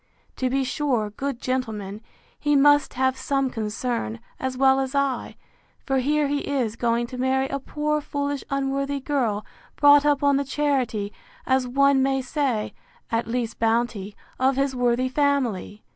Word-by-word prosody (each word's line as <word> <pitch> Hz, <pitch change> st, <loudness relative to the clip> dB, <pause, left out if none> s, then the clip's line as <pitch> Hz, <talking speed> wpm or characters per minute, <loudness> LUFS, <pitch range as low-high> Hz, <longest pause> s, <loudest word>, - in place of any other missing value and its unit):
To 255 Hz, -, 0 dB
be 270 Hz, +1 st, +1 dB
sure, 255 Hz, -6 st, -1 dB
good 270 Hz, +3 st, -4 dB
gentleman! 220 Hz, -6 st, -3 dB, 0.4 s
he 295 Hz, -1 st, +2 dB
must 290 Hz, +1 st, +4 dB
have 260 Hz, 0 st, +2 dB
some 265 Hz, 0 st, -1 dB
concern, 215 Hz, -, -3 dB, 0.2 s
as 260 Hz, -1 st, -3 dB
well 265 Hz, 0 st, +4 dB
as 270 Hz, +1 st, -2 dB
I; 275 Hz, -3 st, -1 dB, 0.5 s
for 270 Hz, -1 st, +1 dB
here 295 Hz, +3 st, +1 dB
he 285 Hz, 0 st, 0 dB
is 255 Hz, -7 st, -1 dB
going 235 Hz, 0 st, +1 dB
to 250 Hz, +1 st, -8 dB
marry 265 Hz, +1 st, +1 dB
a 275 Hz, -, -2 dB
poor 300 Hz, +2 st, -1 dB
foolish 285 Hz, -1 st, -3 dB
unworthy 275 Hz, 0 st, -1 dB
girl, 250 Hz, -7 st, -1 dB, 0.3 s
brought 290 Hz, 0 st, +6 dB
up 290 Hz, -1 st, +2 dB
on 280 Hz, -1 st, +4 dB
the 280 Hz, -, 0 dB
charity, 265 Hz, -8 st, -1 dB, 0.3 s
as 260 Hz, -1 st, +2 dB
one 275 Hz, +1 st, +3 dB
may 270 Hz, 0 st, +2 dB
say, 260 Hz, -4 st, -1 dB, 0.4 s
(at 230 Hz, -1 st, 0 dB
least 230 Hz, -1 st, -3 dB
bounty,) 225 Hz, -3 st, 0 dB, 0.2 s
of 260 Hz, +1 st, +3 dB
his 275 Hz, 0 st, 0 dB
worthy 245 Hz, +1 st, +1 dB
family! 255 Hz, -7 st, 0 dB
265 Hz, 160 wpm, -24 LUFS, 240-280 Hz, 0.5 s, brought